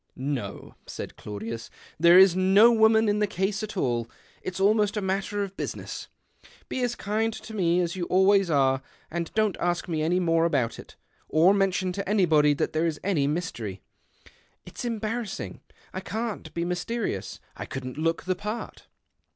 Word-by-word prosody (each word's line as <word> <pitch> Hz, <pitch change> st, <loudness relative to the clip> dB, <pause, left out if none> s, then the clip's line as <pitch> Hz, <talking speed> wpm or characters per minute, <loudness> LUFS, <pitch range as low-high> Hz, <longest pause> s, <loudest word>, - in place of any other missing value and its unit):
" -, -, -46 dB
No," 130 Hz, -6 st, -4 dB
said -, -, -7 dB
Claudius, 110 Hz, +3 st, -6 dB
" -, -, -24 dB
there 170 Hz, +2 st, +7 dB
is 190 Hz, -2 st, +7 dB
no 195 Hz, +5 st, +6 dB
w^oman 220 Hz, 0 st, +5 dB
in 205 Hz, 0 st, +2 dB
the 210 Hz, -, +2 dB
case 195 Hz, +2 st, -1 dB
at 215 Hz, -1 st, -6 dB
all. 120 Hz, -7 st, 0 dB, 0.3 s
It's 185 Hz, 0 st, -5 dB
almost 210 Hz, +1 st, +3 dB
a -, -, +2 dB
matter 195 Hz, +2 st, -1 dB
of 195 Hz, -1 st, -7 dB
business. -, -, -5 dB, 0.6 s
Be 255 Hz, -, -2 dB
as 245 Hz, -1 st, 0 dB
kind 220 Hz, +2 st, -1 dB
to 220 Hz, 0 st, -9 dB
me 180 Hz, -3 st, +2 dB
as 175 Hz, 0 st, -2 dB
you 180 Hz, -2 st, -2 dB
always 190 Hz, +2 st, +4 dB
j 160 Hz, -, +1 dB
re, 135 Hz, -1 st, +3 dB, 0.3 s
and 170 Hz, 0 st, -3 dB
don't 215 Hz, -3 st, +1 dB
ask 175 Hz, 0 st, -1 dB
me 160 Hz, -3 st, -1 dB
any 170 Hz, +4 st, +2 dB
more 165 Hz, -2 st, +2 dB
about 125 Hz, -9 st, 0 dB
it, -, -, -12 dB, 0.3 s
or 170 Hz, +5 st, +5 dB
iiiention 190 Hz, -2 st, +1 dB
to 200 Hz, 0 st, -4 dB
anybody 155 Hz, -8 st, +4 dB
that -, -, -1 dB
there 160 Hz, +2 st, +1 dB
is 155 Hz, -2 st, -3 dB
any 165 Hz, -8 st, +1 dB
mystery. 120 Hz, -, -4 dB, 0.8 s
[t's -, -, -7 dB
embarrassing. 225 Hz, -2 st, -4 dB, 0.3 s
I 185 Hz, -, -3 dB
can't 215 Hz, -4 st, -4 dB
be 170 Hz, 0 st, -1 dB
mysterious. 180 Hz, -, -3 dB
[ -, -, -8 dB
couldn't 130 Hz, +1 st, -6 dB
look 165 Hz, +1 st, 0 dB
the 185 Hz, -, 0 dB
part." 210 Hz, +5 st, -6 dB
185 Hz, 180 wpm, -26 LUFS, 160-205 Hz, 0.8 s, there